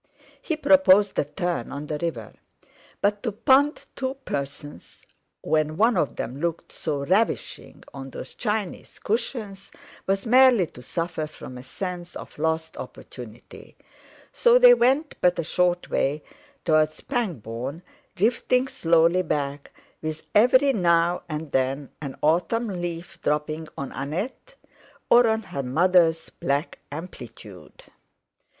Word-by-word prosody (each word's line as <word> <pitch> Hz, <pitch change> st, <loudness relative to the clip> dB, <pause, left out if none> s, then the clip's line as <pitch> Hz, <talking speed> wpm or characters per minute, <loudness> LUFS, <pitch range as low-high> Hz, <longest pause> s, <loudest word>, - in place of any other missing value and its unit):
He 320 Hz, -, -2 dB
proposed 280 Hz, -10 st, +5 dB
a -, -, +1 dB
turn 165 Hz, -2 st, -3 dB
on 145 Hz, +1 st, -5 dB
the 150 Hz, 0 st, -4 dB
river. 130 Hz, -11 st, -4 dB, 0.7 s
But 205 Hz, 0 st, +1 dB
to 225 Hz, -, -2 dB
punt 265 Hz, +7 st, +3 dB
two 265 Hz, 0 st, -3 dB
persons 140 Hz, -5 st, -6 dB, 0.4 s
when 155 Hz, 0 st, 0 dB
one 225 Hz, +3 st, +4 dB
of 155 Hz, -6 st, 0 dB
them 130 Hz, +5 st, -5 dB
looked 170 Hz, -1 st, -3 dB
so 145 Hz, -3 st, -3 dB
ravishing 200 Hz, +8 st, -1 dB
on 135 Hz, -1 st, -7 dB
those -, -, -9 dB
Chinese 210 Hz, -5 st, -3 dB
cushions 215 Hz, -3 st, -3 dB, 0.4 s
was 195 Hz, +2 st, 0 dB
merely 250 Hz, -4 st, +6 dB
to 125 Hz, -, -14 dB
suffer 165 Hz, +2 st, -3 dB
from 130 Hz, -4 st, -11 dB
a 125 Hz, -, -8 dB
sense 180 Hz, +5 st, -6 dB
of -, -, -10 dB
lost 160 Hz, +1 st, -1 dB
opportunity; -, -, -11 dB, 0.6 s
so 485 Hz, 0 st, +5 dB
they -, -, +9 dB
went 290 Hz, -, +1 dB
but 180 Hz, 0 st, +3 dB
a 170 Hz, -, -1 dB
short 180 Hz, +2 st, 0 dB
way 145 Hz, +2 st, 0 dB, 0.4 s
towards 155 Hz, -1 st, +2 dB
Pangbourne, 145 Hz, -, -4 dB, 0.3 s
drifting 250 Hz, +5 st, +2 dB
slowly 170 Hz, -3 st, +3 dB
back, 145 Hz, -4 st, -3 dB, 0.3 s
with 155 Hz, 0 st, -5 dB
every 260 Hz, +5 st, +5 dB
now 175 Hz, -3 st, +2 dB
and 155 Hz, -1 st, -5 dB
then 135 Hz, +1 st, -1 dB
an 140 Hz, -3 st, -6 dB
autumn 180 Hz, +9 st, +1 dB
leaf 175 Hz, -2 st, -5 dB
dropping 155 Hz, +1 st, -1 dB
on 140 Hz, -1 st, -5 dB
Annette 185 Hz, -, -5 dB, 0.6 s
or 240 Hz, 0 st, +7 dB
on 220 Hz, 0 st, +1 dB
her 140 Hz, -7 st, -5 dB
mother's 165 Hz, +4 st, +2 dB
black 140 Hz, +4 st, -2 dB
amplitude. 145 Hz, -, -10 dB
170 Hz, 130 wpm, -25 LUFS, 150-220 Hz, 0.7 s, they